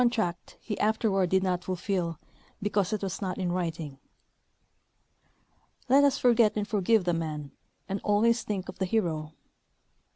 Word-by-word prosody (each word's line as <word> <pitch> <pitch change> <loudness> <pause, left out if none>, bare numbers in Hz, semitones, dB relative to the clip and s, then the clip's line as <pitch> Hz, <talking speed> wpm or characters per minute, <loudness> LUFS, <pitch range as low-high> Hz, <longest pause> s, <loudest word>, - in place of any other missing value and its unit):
tract 180 -8 -3
he 210 - -5
afterward 210 -4 +2
did 190 +1 +3
not 180 -2 0
fulHll 180 -2 -2 0.4
because 200 -1 0
it 215 -2 -2
was 190 0 -3
not 185 -2 -2
in 180 -2 -1
writing. 165 -6 -3 1.9
Let 275 +3 +6
ns 280 -1 +4
forget 235 -3 +4
and 210 -1 -1
forgive 215 -1 +2
the 175 -1 +1
man 155 -4 -3 0.4
and 195 0 -3
always 225 +3 +3
think 195 -3 -3
of - - -9
the 190 - +1
hero. 160 -7 -1
190 Hz, 150 wpm, -28 LUFS, 175-215 Hz, 1.9 s, Let